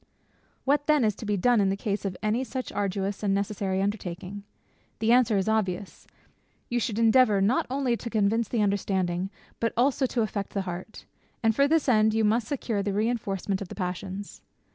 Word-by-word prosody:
What 290 +1 +2
then 300 -4 +4
it 215 - +3
to 220 - -7
be 205 -1 +1
done 235 +4 +3
in 195 - +2
the 195 - -1
case 205 0 -2
of 185 -2 -3
any 220 +4 +1
such 260 0 -5
arduous 195 0 -2
and 200 -2 +1
necessary 195 -1 -1
undertaking? 195 -1 -4 0.6
The 220 +1 +1
answer 240 -4 +4
is 190 - 0
obvious 200 -3 -2 0.6
You 240 - +1
should 225 -2 -2
endeavour 225 -2 +5
not 205 +6 +2
only 260 -2 0
to 235 - -6
convince 220 +1 +1
the 225 -1 0
understanding, 190 -2 0 0.3
but 230 - 0
also 265 +2 +3
to 240 -2 0
affect 200 -2 -4
the 200 - +1
heart; 185 +3 -7 0.4
and 225 -1 +3
for 280 +3 +4
this 320 0 +2
end, 220 -3 +4
you 225 - +2
must 215 +2 +2
secure 235 -7 -2
the 200 0 -2
reinforcement 205 -3 -1
of 200 - -5
the - - -9
passions. 190 +1 -5
210 Hz, 190 wpm, -27 LUFS, 195-235 Hz, 0.6 s, endeavour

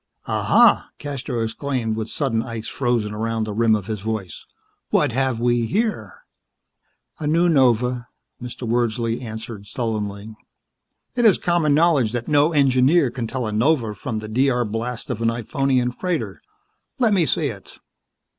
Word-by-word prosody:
_ - - -55 0.2
"Ah, - - -1
ha!" - - +4
DeCastros 135 -5 -4
exclaimed 115 -1 -2
with 110 0 -4
sudden 125 -6 -1
ice 115 -2 -6
frozen 120 -5 -1
around 115 +1 -2
the 110 -1 -4
rim 110 0 +3
of 105 -3 -4
his 110 -1 -4
voice. 105 -4 -5 0.4
"What 145 -4 +2
have 130 -1 0
we 120 -1 +1
here?" 220 - -2 1.0
"A 150 - -3
new 165 +3 +3
nova," 125 -4 +2 0.3
Mr. 120 0 -6
Wordsley 115 0 0
answered 110 -3 -7
sullenly. 110 -2 -4 0.8
"It 240 - 0
is 215 -5 +6
common 170 -4 +2
knowledge 150 -8 +3
that 120 -1 -3
no 150 +1 +3
engineer 135 0 +3
can 120 -2 -4
tell 125 +1 -3
a 110 - -3
nova 115 0 +1
from 110 +3 -5
the 110 0 -5
D.R. 125 +2 +1
blast 115 +3 -4
of 115 -2 -4
an 115 - +3
Iphonian 125 +2 0
freighter. 180 +7 -3 0.6
Let 235 -5 +3
me 175 -5 +3
see 150 -3 +1
it." 100 -5 -11
120 Hz, 160 wpm, -22 LUFS, 110-140 Hz, 1.0 s, is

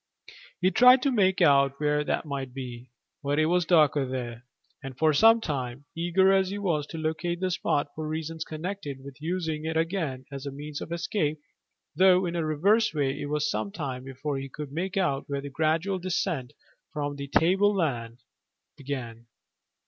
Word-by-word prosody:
He 185 +1 +3
tried 250 +3 +7
to 275 - +2
make 190 -5 +2
out 140 -2 +4
where 150 0 +1
that 150 - -1
might 135 -3 -5
be, 125 -2 -7 0.3
but 145 0 -1
it 155 - +4
was 175 +1 +2
darker 150 -4 +4
there, 125 -2 -5 0.4
and 135 -3 -8
for 155 +1 +3
some 225 +8 +6
time, 140 - -4
eager 180 +3 +3
as 190 -1 +3
he 200 - -4
was 165 -8 -1
to 165 - -7
locate 160 +2 -2
the 185 0 -1
spot 145 -3 0
for 155 0 -5
reasons 160 +1 -4
connected 155 -4 -6
with 140 +1 -11
using 160 -2 -2
it 160 0 -2
again 160 -6 -2
as 140 0 -6
a - - -4
means 145 +1 -7
of - - -7
escape, 165 -3 -1 0.6
though 185 0 +5
in 175 0 -3
a 170 - 0
reverse 195 +9 +2
way, 140 -1 0
it - - -3
was 150 0 0
some 105 -1 -2
time 130 -2 -5
before 135 +2 -4
he 135 0 -6
could 145 +1 -7
make 180 +6 -3
out 140 -8 0
where 140 -1 -2
the 140 0 -7
gradual 165 +6 0
descent 175 -7 -2 0.4
from 145 -2 -3
the 140 0 -6
tableland 160 - +1 0.5
began. 120 -4 -6
150 Hz, 180 wpm, -27 LUFS, 140-175 Hz, 0.6 s, tried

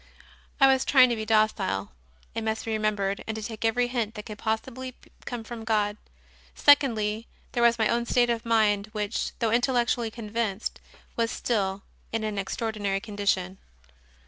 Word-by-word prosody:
I 275 - +8
was 265 -1 +4
trying 255 -3 +6
to - - +1
be 220 -1 -5
docile, 215 - +1 0.4
it 225 0 -3
must 220 0 -2
be 225 - -3
remem 215 -1 +1
bered, 200 0 -2
and 220 - -3
to 220 - -5
take 220 +1 -6
every 245 +2 +2
hint 235 -3 -2
that 210 - -7
could 210 -2 -8
possibly 255 +3 -3 0.3
come 240 -2 -4
from 225 0 -7
God. 210 -2 +1 0.6
Secondly, 230 -6 +3 0.2
there 240 - -1
was 235 0 +5
my 220 -2 +3
own 235 0 0
state 240 0 +3
of 230 -1 -2
mind, 215 -3 +2
which, 210 +1 -2
though 230 -2 0
intellectually 240 -1 +2
convinced, 220 -2 -3 0.3
was 230 -1 +1
still 195 -5 -1 0.3
in 225 -1 -1
an 210 -2 -2
extraordinary 205 -1 -2
condition. 200 -3 -1
220 Hz, 170 wpm, -27 LUFS, 210-235 Hz, 0.6 s, I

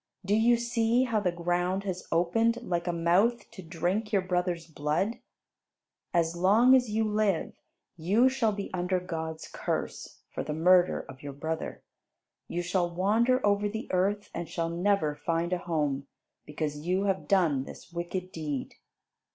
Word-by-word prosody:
Do 200 - +1
you 235 +2 +4
see 235 +1 +2
how 230 -4 +1
the 185 -4 0
ground 175 +2 -1
has 185 -2 -4
opened, 225 +8 +2
like 175 -4 -2
a - - +2
mouth, 180 +8 +2
to 215 -4 -10
drink 180 +6 -2
your 195 -3 +2
brother's 180 -2 -1
blood? 155 +8 -1 0.9
As 170 -1 +1
long 210 +9 +5
as 250 -3 +2
you 220 +1 +1
live, 210 -4 0 0.4
you 200 +10 +3
shall 260 -4 +1
be 200 -1 -5
under 180 0 0
God's 160 -3 -5
curse - - -4
for - - -3
the 150 - -4
murder 180 +2 +4
of 130 -1 -13
your 145 -1 -6
brother. 160 +3 -4 0.6
You 175 +1 -3
shall 175 0 0
wander 220 +8 +2
over 205 0 +2
the 220 +4 -6
earth, 200 +3 0
and 170 - -5
shall 165 -1 -2
never 175 -2 +1
find 165 +4 -1
a 180 - 0
home, 150 -5 -1 0.4
because 150 0 -3
you 185 +3 +1
have 195 -1 -1
done 160 -9 +2
this 170 - -12
wicked 180 +2 -4
deed." 150 -5 -4
180 Hz, 160 wpm, -29 LUFS, 165-210 Hz, 0.9 s, long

